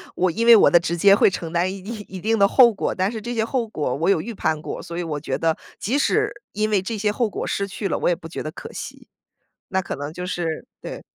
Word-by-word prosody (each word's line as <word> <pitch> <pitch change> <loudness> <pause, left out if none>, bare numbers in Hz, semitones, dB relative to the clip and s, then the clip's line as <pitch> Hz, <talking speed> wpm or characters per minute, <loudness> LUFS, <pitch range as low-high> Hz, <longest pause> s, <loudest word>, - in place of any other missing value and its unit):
我 185 - +2
因 230 +7 -1
为 235 - +9
我 215 - +6
的 175 - +6
直 170 0 -2
接 195 +3 +6
会 - - +5
承 170 -3 -5
担 175 +2 +1
一 195 - -8
定 210 +1 -7
一 190 - -8
定 225 +2 +1
的 200 0 +5
后 240 0 +6
果。 - - -2
但 190 +3 0
是 225 - -5
这 240 +3 -4
些 225 - +1
后 235 0 -1
果 150 -11 -2
我 165 +6 0
有 175 -5 +3
预 235 +4 -6
判 155 -5 -1
过， - - -5
所 170 0 -7
以 175 - -2
我 155 -3 -3
觉 150 - -3
得 160 -1 +1 0.2
即 250 +8 0
使 - - +2 0.2
因 215 +1 0
为 205 -3 +2
这 215 +3 -4
些 210 0 +1
后 230 0 0
果 - - -4
失 200 - -1
去 200 0 -4
了， - - -1
我 - - 0
也 175 - +2
不 165 - -10
觉 165 - -6
得 155 - -5
可 - - -9
惜。 - - -8 0.6
那 190 0 +1
可 - - -5
能 145 +2 -5
就 180 +2 -6
是 170 -3 -3
对。 - - -7
190 Hz, 305 characters per minute, -22 LUFS, 170-215 Hz, 0.6 s, 为